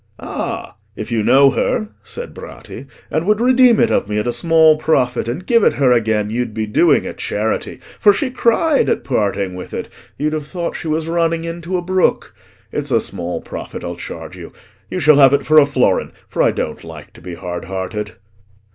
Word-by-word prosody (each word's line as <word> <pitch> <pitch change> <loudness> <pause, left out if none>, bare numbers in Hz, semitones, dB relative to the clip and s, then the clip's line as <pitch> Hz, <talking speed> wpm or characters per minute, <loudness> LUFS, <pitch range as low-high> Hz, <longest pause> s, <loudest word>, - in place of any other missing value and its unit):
"Ah! - - -5 0.2
if 110 - -7
you 115 -2 +1
know 135 +5 +5
her," 215 +9 -1
said 485 +1 -7
Bratti, - - -10 0.2
"and 155 - 0
would 210 0 +3
redeem 250 -1 +5
it 235 - +3
of 100 - 0
me 105 - -1
at 105 - -1
a 120 - -1
small 160 -2 +4
profit, 130 -7 0
and 130 +10 -4
give 230 -3 +3
it - - +4
her 135 -3 +2
again, 110 -3 +1
you'd 120 -1 -3
be 110 -1 -1
doing 105 - +3
a - - -5
charity, 110 +2 -3 0.2
for 205 - +6
she 255 +6 -2
cried 265 +5 +2
at - - 0
parting 100 -6 -1
with 90 0 -8
it—you'd 150 +2 -5
have 150 -2 -4
thought 170 +1 -4
she 165 - -6
was 155 +1 -1
running 165 0 0
into 170 +2 -4
a 175 - -4
brook. 185 +1 0 0.4
It's - - -3
a - - +3
small 85 0 -4
profit - - -8
I'll - - -5
charge - - -8
you. - - -11 0.4
You 185 - -3
shall 150 -2 +5
have 135 -1 +6
it 140 - -3
for 155 0 +6
a 140 - +4
florin, 135 -3 +1
for - - -2
I - - +4
don't - - -4
like - - -11
to - - -16
be 90 0 -7
hard 90 +1 -6
hearted." 95 +3 -5
145 Hz, 205 wpm, -18 LUFS, 110-175 Hz, 0.4 s, for